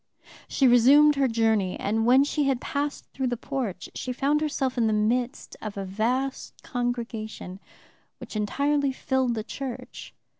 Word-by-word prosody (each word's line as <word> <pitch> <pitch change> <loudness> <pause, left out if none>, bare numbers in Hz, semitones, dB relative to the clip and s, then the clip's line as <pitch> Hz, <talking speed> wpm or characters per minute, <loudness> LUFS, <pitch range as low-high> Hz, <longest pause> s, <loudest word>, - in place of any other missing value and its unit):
She 270 - +3
resumed 275 +5 +7
her 275 -2 +2
journey, 220 -5 +1
and 220 +3 0
when 260 +3 +6
she 290 0 0
had 270 -3 +1
passed 290 0 -3
through 265 -1 -1
the 245 -1 -2
porch 240 -7 -4
she 255 - -4
found 285 +4 +1
herself 275 -4 -1
in 235 -3 +2
the 215 - +1
midst 235 +4 -1
of 210 -2 -6
a 195 - -3
vast 245 +8 -2
congregation 230 -6 -4 0.6
which - - -10
entirely 280 +6 +1
filled 260 -2 0
the 220 - -3
church. 260 +2 -7
245 Hz, 155 wpm, -26 LUFS, 220-275 Hz, 0.6 s, resumed